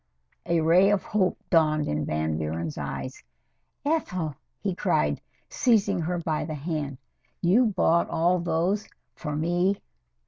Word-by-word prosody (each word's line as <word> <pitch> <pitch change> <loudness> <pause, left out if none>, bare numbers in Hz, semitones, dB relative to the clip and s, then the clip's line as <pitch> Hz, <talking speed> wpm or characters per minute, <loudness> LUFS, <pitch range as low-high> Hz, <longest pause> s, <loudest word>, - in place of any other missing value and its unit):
A 170 -1 +2
ray 175 +5 +5
of 205 -1 +2
hope 195 -3 +1
dawned 155 -2 +3
in 75 0 -1
Van 80 0 -1
Buren's 80 +1 -3
eyes. 130 +1 -5 0.6
"Ethel!" 185 - -1 0.3
he - - -1
cried, 75 -1 +1 0.3
seising 205 -6 +2
her 175 +1 -1
by 160 -2 -1
the 155 0 -4
hand. 145 -2 -3 0.4
"You 210 +8 +4
bought 170 -4 +2
all 175 +2 +2
those 175 +5 0 0.3
for 150 -3 -5
me?" 175 +5 +1
165 Hz, 135 wpm, -26 LUFS, 150-185 Hz, 0.6 s, ray